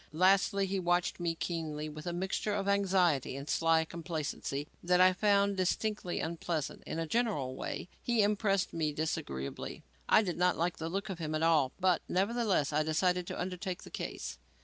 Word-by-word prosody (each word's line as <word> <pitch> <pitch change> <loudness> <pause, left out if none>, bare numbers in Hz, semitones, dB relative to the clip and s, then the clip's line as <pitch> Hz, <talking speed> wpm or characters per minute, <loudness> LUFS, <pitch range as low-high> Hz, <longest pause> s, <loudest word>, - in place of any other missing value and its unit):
Lastly, 195 +3 +4
he 195 0 -1
watched 175 0 +1
me 170 -1 -1
keenly 155 -3 -3
with 155 +2 -8
a - - 0
mixture 190 +4 -1
of 200 -1 -2
anxiety 185 -9 +2
and 140 +1 -6
sly 165 0 +3
complacency 155 -4 -4
that 180 +1 +3
I 185 0 +7
found 200 0 +3
distinctly 190 0 -1
unpleasant. 165 -2 -3
In - - -3
a 165 - -1
general 160 - 0
way, - - -4
he 235 -3 +2
impressed 200 -2 +1
me 155 -2 0
disagreeably. 70 - -4 0.3
I 220 - +6
did 180 -4 -3
not 180 0 +3
like 170 +1 0
the 160 0 -4
look 195 +4 -3
of 180 - -6
him 155 -1 -2
at 155 - 0
all; 155 -5 +4
but 185 -2 +3
nevertheless 195 - +1
I 150 - +3
decided 180 +3 +1
to - - -5
undertake 180 +1 -4
the - - -12
case. 65 0 -5
175 Hz, 180 wpm, -32 LUFS, 155-195 Hz, 0.3 s, I